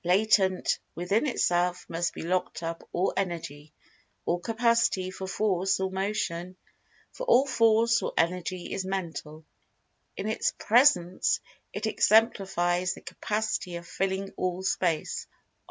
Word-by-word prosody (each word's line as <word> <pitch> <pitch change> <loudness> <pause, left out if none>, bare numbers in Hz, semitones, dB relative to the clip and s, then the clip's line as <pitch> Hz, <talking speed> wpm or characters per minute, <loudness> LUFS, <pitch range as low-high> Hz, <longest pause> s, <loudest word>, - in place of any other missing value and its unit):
Latent 190 0 +3 0.2
within 200 - 0
itself 180 -7 +1
must 170 +1 -2
be - - -6
locked 180 0 -1
up 165 0 -5
all 180 +2 0
Energy, 160 -5 -4 0.5
or 175 - 0
capacity 230 -3 +1
for 190 0 -6
Force 190 -2 +1
or 190 0 -1
Motion, 190 -2 -3 0.5
for - - -7
all 275 - +5
Force 230 -2 +3
or - - -2
Energy 180 +1 -1
is 190 - -2
Mental. 165 -5 -5 0.7
In 195 - -3
its 220 - 0
very - - -12
presence 205 -7 +4 0.3
it 210 - -4
exemplifies 190 -5 +2
the - - -12
capacity 210 -4 -3
of 170 0 -7
filling 195 +3 -2
All 185 0 -2
Space. 180 -4 -1
185 Hz, 130 wpm, -28 LUFS, 175-215 Hz, 0.7 s, all